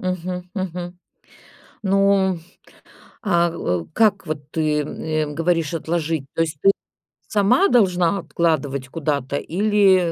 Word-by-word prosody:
Мгм 180 0 -4
мгм. 180 -2 -5 0.8
Ну, 195 -2 +3 0.9
а, 175 -4 +3
э, 90 - -2
как 200 -4 +2
вот 145 -2 -5
ты, 155 -2 +1
э, 155 +1 -2
говоришь- 165 0 0
отложить? 160 -2 -2
То - - 0
есть 155 -3 -1
ты 195 - +6 0.6
сама 225 - +3
должна 185 -4 +3
откладывать 145 -7 -1
куда-то 140 -2 -2
или, 190 -1 +3
175 Hz, 115 wpm, -21 LUFS, 155-195 Hz, 0.9 s, ты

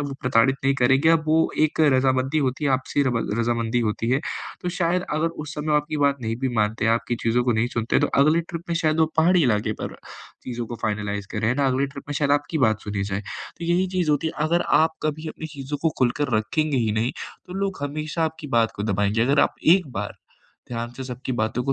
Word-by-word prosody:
वो 140 -1 -4
प्रताड़ित 125 +1 +3
नहीं 135 0 +3
करेंगे, 135 +4 +3
अब 165 -1 +4
वो 160 +1 +3
एक 155 0 +2
रज़ामंदी 130 +2 +2
होती 135 0 -1
है, 140 - +2
आपसी 130 +2 +1
रबा 125 -4 0 0.2
रज़ामंदी 115 0 0
होती 110 +2 -2
है। 135 - +2 0.4
तो 180 - -2
शायद 175 +1 +1
अगर 155 +2 +1 0.2
उस 150 +1 -8
समय 150 +1 -4
वो 150 - +3
आपकी 150 +1 -1
बात 140 -1 +3
नहीं 115 0 -2
भी 135 - +1
मानते 105 +1 +1
हैं, 115 - +4
आपकी 120 +1 -1
चीज़ों 115 +2 +2
को 120 - +2
नहीं 110 +1 +1
सुनते 115 -1 +1
हैं, - - +3
तो - - +4 0.2
अगले 155 +3 +4
ट्रिप 170 0 -5
में 170 - +1
शायद 160 -2 +1
वो 160 - +5
पहाड़ी 170 +2 +4
इलाके 110 -4 +1
पर - - -5 0.5
चीज़ों 120 -2 -4
को 120 - -6
फ़ाइनलाइज़ 105 -2 -2
करें, 110 +1 0
है 125 - +2
ना, 140 0 +1
अगले 135 +1 +1
ट्रिप 140 0 -10
में 145 - -3
शायद 145 -1 0
आपकी 145 +2 0
बात 110 -1 0
सुनी 105 -1 -3
जाए। 100 0 -3 0.4
तो 170 - -5
यही 175 +2 +2
चीज़ 175 -4 +2
होती, 150 +2 +1 0.2
अगर 170 +2 +2 0.2
आप 160 0 +1
कभी 155 +1 -2
अपनी 160 - -7
चीज़ों 140 +1 -4
को 165 - +3
खुलकर 125 -1 +1
रखेंगे 150 +7 0
ही 115 -4 +1
नहीं, 110 +3 0 0.3
तो 180 - -9
लोग 195 0 -2
हमेशा 155 +3 -2
आपकी 160 -1 -4
बात 115 -1 +3
को 100 - -3
दबाएँगे। 105 +1 +1
अगर 140 +4 +3
आप - - -24 0.2
एक 180 -6 -1
बार 105 - -4 0.5
ध्यान 120 -1 -4
से 130 - -5
सबकी 130 +1 -5
बातों 110 +3 0
को 135 - +1
135 Hz, 240 wpm, -23 LUFS, 115-155 Hz, 0.5 s, वो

